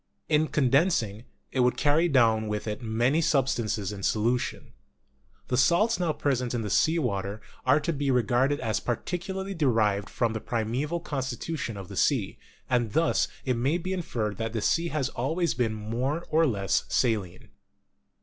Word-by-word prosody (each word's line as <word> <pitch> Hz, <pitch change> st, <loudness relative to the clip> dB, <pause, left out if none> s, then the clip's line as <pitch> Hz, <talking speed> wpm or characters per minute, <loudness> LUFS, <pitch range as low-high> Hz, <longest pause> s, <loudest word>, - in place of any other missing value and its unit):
In 155 Hz, 0 st, +3 dB
condensing, 130 Hz, -, +1 dB, 0.3 s
it 130 Hz, -, -2 dB
would 125 Hz, 0 st, +3 dB
carry 150 Hz, +4 st, +3 dB
down 115 Hz, -5 st, +3 dB
with 105 Hz, +1 st, -3 dB
it 105 Hz, +3 st, -3 dB
many 120 Hz, +7 st, +1 dB
substances 120 Hz, -, 0 dB
in 100 Hz, -1 st, -7 dB
solution. 120 Hz, +5 st, -1 dB, 0.8 s
The 125 Hz, -, +1 dB
salts 185 Hz, -, +3 dB
now 175 Hz, -3 st, +1 dB
present 125 Hz, -5 st, -1 dB
in 115 Hz, -3 st, -2 dB
sea 160 Hz, +2 st, +3 dB
water 100 Hz, -, -2 dB, 0.3 s
are 140 Hz, +4 st, +5 dB
to 170 Hz, -, -1 dB
be 140 Hz, -1 st, -1 dB
regarded 125 Hz, +3 st, +2 dB
as 110 Hz, -1 st, 0 dB
partially 190 Hz, -, -3 dB
de 160 Hz, -6 st, +1 dB
rived 105 Hz, -4 st, +1 dB
from 115 Hz, -2 st, 0 dB
the 110 Hz, -, -4 dB
primeval 125 Hz, +9 st, -2 dB
constitution 130 Hz, -3 st, -4 dB
of 95 Hz, -2 st, -8 dB
the -, -, -9 dB
sea, -, -, +1 dB, 0.3 s
and 120 Hz, -4 st, 0 dB
thus 165 Hz, +1 st, +2 dB, 0.2 s
it 130 Hz, -, +1 dB
may 135 Hz, +8 st, +1 dB
be 185 Hz, +2 st, -3 dB
inferred 110 Hz, -, -3 dB
that 115 Hz, 0 st, -3 dB
the 110 Hz, -, -1 dB
sea 170 Hz, +1 st, +2 dB
has 150 Hz, -5 st, -1 dB
always 160 Hz, +8 st, -1 dB
been 115 Hz, -3 st, 0 dB
more 125 Hz, +10 st, -2 dB
or 160 Hz, +1 st, +4 dB
less 100 Hz, -6 st, 0 dB
saline. 105 Hz, -8 st, -1 dB
125 Hz, 165 wpm, -27 LUFS, 110-155 Hz, 0.8 s, are